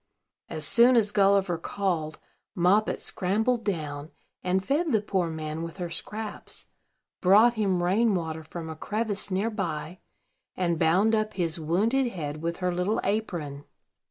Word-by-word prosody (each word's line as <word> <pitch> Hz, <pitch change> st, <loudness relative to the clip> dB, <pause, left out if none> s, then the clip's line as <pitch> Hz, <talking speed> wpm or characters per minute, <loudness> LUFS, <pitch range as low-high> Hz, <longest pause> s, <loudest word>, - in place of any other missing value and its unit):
As 155 Hz, -1 st, -3 dB
soon 240 Hz, +8 st, +5 dB
as 215 Hz, -3 st, +3 dB
Gulliver 195 Hz, -4 st, +3 dB
called, 165 Hz, -5 st, -2 dB, 0.4 s
Moppet 195 Hz, +5 st, +2 dB
scrambled 220 Hz, +6 st, 0 dB
down, 150 Hz, -7 st, -3 dB, 0.3 s
and 185 Hz, +1 st, 0 dB
fed 305 Hz, +3 st, +1 dB
the 220 Hz, -, +4 dB
poor 190 Hz, -4 st, -1 dB
man 155 Hz, 0 st, -4 dB
with 165 Hz, +1 st, -6 dB
her 175 Hz, -2 st, -4 dB
scraps, 215 Hz, +4 st, -5 dB, 0.5 s
brought 210 Hz, +6 st, +6 dB
him 195 Hz, -6 st, 0 dB
rain 205 Hz, +4 st, +3 dB
water 160 Hz, -2 st, -3 dB
from 160 Hz, +1 st, -7 dB
a 160 Hz, -, -6 dB
crevice 205 Hz, +3 st, -1 dB
near 200 Hz, +4 st, 0 dB
by, 175 Hz, -4 st, -4 dB, 0.6 s
and 170 Hz, -3 st, 0 dB
bound 185 Hz, +7 st, +3 dB
up 215 Hz, -1 st, 0 dB
his 170 Hz, -2 st, -1 dB
wounded 215 Hz, -, +1 dB
head 155 Hz, -3 st, -5 dB
with 170 Hz, 0 st, -2 dB
her 180 Hz, -1 st, -1 dB
little 180 Hz, +5 st, 0 dB
apron. 170 Hz, -9 st, -2 dB
185 Hz, 150 wpm, -27 LUFS, 165-215 Hz, 0.6 s, brought